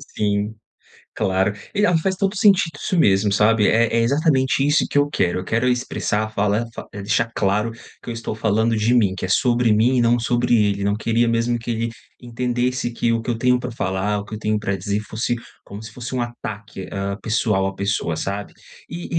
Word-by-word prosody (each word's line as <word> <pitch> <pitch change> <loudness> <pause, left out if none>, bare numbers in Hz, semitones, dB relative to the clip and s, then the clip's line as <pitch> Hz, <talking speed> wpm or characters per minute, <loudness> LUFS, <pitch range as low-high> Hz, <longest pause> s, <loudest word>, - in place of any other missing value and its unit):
Sim. 105 +1 -1 0.6
Claro, 95 0 +1 0.2
E, 205 0 +3
ah, 175 - +3
faz 190 +3 -1
todo 195 +1 0
o - - -6
sentido 195 -7 +4
isso 185 - -1
mesmo, 100 -7 +3
sabe, 105 +1 +3
é 115 +1 +4
é 115 - +3
exatamente 135 +1 +2
isso 150 +2 +2
que - - -1
eu 145 - +4
quero. 90 -9 0
Eu 90 - -5
quero 115 +5 0
expressar, 115 -3 -1
falar 105 +2 +1
fa - - -8
eh, 100 - -6
deixar 105 +3 0
claro 105 +3 +1 0.3
que - - -9
eu - - -3
estou 115 -1 -4
falando 110 +1 +1
de 110 +3 +2
mim, 105 -6 +3
que 95 - -4
é 90 - -5
sobre 120 +1 +3
mim 120 +4 +3
e - - +3
não 120 +1 +3
sobre 120 +1 +1
ele. 100 -2 +1
Não 100 0 +1
queria 115 +2 +1
mesmo 115 +1 +1
que 115 - -8
ele 115 0 -1 0.3
entendesse 125 +1 -1
que 115 0 0
o 115 - 0
que 120 - -6
eu 115 - 0
tenho 125 +1 +2
pra 125 - -5
falar, 105 -2 -1
o 100 - -7
que 105 - -10
eu - - -7
tenho 105 0 0
pra 100 -1 -2
dizer 100 +3 -2
fosse 110 +2 -2 0.3
como 100 +2 -9
se 110 - -9
fosse 125 +3 -6
um 125 - 0
ataque, 110 -4 -7
ah, 100 0 -3
pessoal 110 -4 +1
à 95 - -5
pessoa, 100 -4 -1
sabe, 100 +5 -4 0.4
e 170 0 -6
115 Hz, 220 wpm, -21 LUFS, 105-125 Hz, 0.6 s, sentido